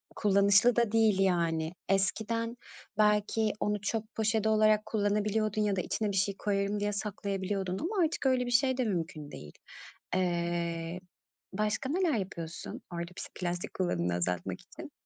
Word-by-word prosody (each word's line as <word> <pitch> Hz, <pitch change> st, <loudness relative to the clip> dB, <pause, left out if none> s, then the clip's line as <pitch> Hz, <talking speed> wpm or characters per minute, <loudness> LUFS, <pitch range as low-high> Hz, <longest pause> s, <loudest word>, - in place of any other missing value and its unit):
kullanışlı 200 Hz, +3 st, +4 dB
da 235 Hz, -3 st, +2 dB
değil, 220 Hz, -4 st, +4 dB
yani. 170 Hz, -3 st, +1 dB, 0.2 s
Eskiden, 225 Hz, +5 st, 0 dB, 0.4 s
belki 210 Hz, +1 st, +3 dB
onu 210 Hz, -1 st, 0 dB
çöp 220 Hz, +1 st, -3 dB
poşeti 220 Hz, 0 st, +1 dB
olarak 215 Hz, 0 st, +4 dB
kullanabiliyordun 210 Hz, 0 st, 0 dB
ya 205 Hz, -2 st, +2 dB
da 185 Hz, -, 0 dB
içine 210 Hz, +2 st, -1 dB
bir 195 Hz, -, -2 dB
şey 195 Hz, +1 st, +1 dB
koyarım 200 Hz, 0 st, 0 dB
diye 205 Hz, 0 st, -1 dB
saklayabiliyordun 195 Hz, -2 st, -2 dB
ama 365 Hz, +3 st, +1 dB
artık 315 Hz, -3 st, -1 dB
öyle 255 Hz, -2 st, +3 dB
bir 245 Hz, -, -3 dB
şey 260 Hz, +1 st, +3 dB
de 255 Hz, -, +2 dB
mümkün 165 Hz, -7 st, -3 dB
değil. 75 Hz, 0 st, -10 dB, 0.6 s
Eee, 170 Hz, -1 st, -1 dB, 0.5 s
başka 215 Hz, +5 st, -1 dB
neler 345 Hz, 0 st, +2 dB
yapıyorsun 170 Hz, -4 st, -6 dB
orada 170 Hz, 0 st, -4 dB
pis -, -, -6 dB
plastik 175 Hz, -1 st, -3 dB
kullanımını 90 Hz, -, 0 dB
azaltmak 90 Hz, 0 st, -2 dB
için? -, -, -11 dB
205 Hz, 145 wpm, -30 LUFS, 180-220 Hz, 0.6 s, kullanışlı